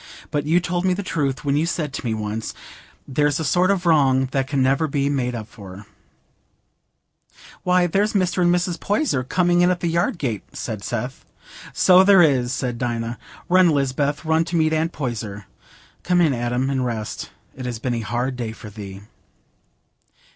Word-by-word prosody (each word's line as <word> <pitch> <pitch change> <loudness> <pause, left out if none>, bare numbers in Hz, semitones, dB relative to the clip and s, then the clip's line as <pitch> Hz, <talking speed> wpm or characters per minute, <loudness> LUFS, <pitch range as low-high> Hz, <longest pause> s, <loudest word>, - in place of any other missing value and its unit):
But 145 0 -1
you 170 +3 +4
told 175 0 -2
me 185 -1 +2
the 200 - -4
truth 140 -6 -2
when 140 0 +1
you 155 +3 +1
said 155 -5 -2
to - - -5
me 115 -3 -1
once, 105 +1 -4 0.5
"There's 145 +2 +1
a - - -1
sort 180 +5 +2
of 190 -3 +1
wrong 135 -5 +3
that 135 -1 0
can 135 -1 +1
never 135 +4 +2
be 140 -1 0
made 125 -3 -1
up 110 -2 -6
for."'" 100 -1 -11 1.8
"Why, 180 0 +3
there's 200 +5 +1
Mr. 185 -2 +1
and 175 0 +4
Mrs. 175 -1 0
Poyser 205 - 0
coming 175 +5 +2
in 175 - +4
at 180 -1 0
the 175 - -1
yard 170 +1 0
gate," 115 - -2
said 105 -3 -5
Seth. 125 +3 -4 0.5
"So 185 0 +6
there 190 -2 +7
is," 130 -5 +2
said 125 -3 -3
Dinah. 120 -1 -3 0.3
"Run, 185 0 +5
Lisbeth, 145 +1 0
run 160 +1 +3
to 175 - -4
meet 160 -1 +2
Aunt 160 +1 0
Poyser. 110 - -5 0.6
Come 180 0 +1
in, 160 -5 +4
Adam, 125 +2 -1
and 130 -2 0
rest; 115 -4 -4 0.3
it 130 -1 -6
has 120 -2 -3
been 120 +2 -2
a 115 - -1
hard 120 +4 -2
day 115 -3 -4
for 110 -2 -11
thee." 100 -2 -9
140 Hz, 185 wpm, -22 LUFS, 120-175 Hz, 1.8 s, there